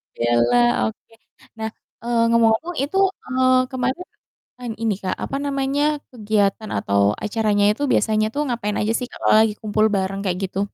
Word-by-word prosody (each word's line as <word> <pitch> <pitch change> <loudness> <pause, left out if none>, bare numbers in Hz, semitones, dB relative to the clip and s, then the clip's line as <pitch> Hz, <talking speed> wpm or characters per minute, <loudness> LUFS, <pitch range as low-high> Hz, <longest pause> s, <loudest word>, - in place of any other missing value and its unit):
bela, 120 +1 +2 0.3
oke. 170 - -10 0.4
Nah, 220 0 -3 0.3
eee, 235 -1 +1
ngomong-ngomong 230 +9 +2
itu, 300 +7 -2 0.3
eee, 255 0 +3
kemarin, 260 +7 -2 0.6
an 240 -2 -4
ini 220 -3 +1
Kak, 185 - -1
apa 275 - -3
namanya, 275 +1 -1 0.3
kegiatan 215 -2 0
atau 100 0 +1 0.2
acaranya 210 -1 +1
itu 285 - -5
biasanya 215 -1 +2
tuh 290 - -1
ngapain 220 -4 -2
aja 215 +2 0
sih 250 - -2
Kak - - -12
kalau - - +4
lagi 220 -1 +2
kumpul 215 0 +1
bareng 195 +1 -2
kayak 180 -2 -2
gitu? 190 +1 -5
220 Hz, 160 wpm, -21 LUFS, 205-255 Hz, 0.6 s, kalau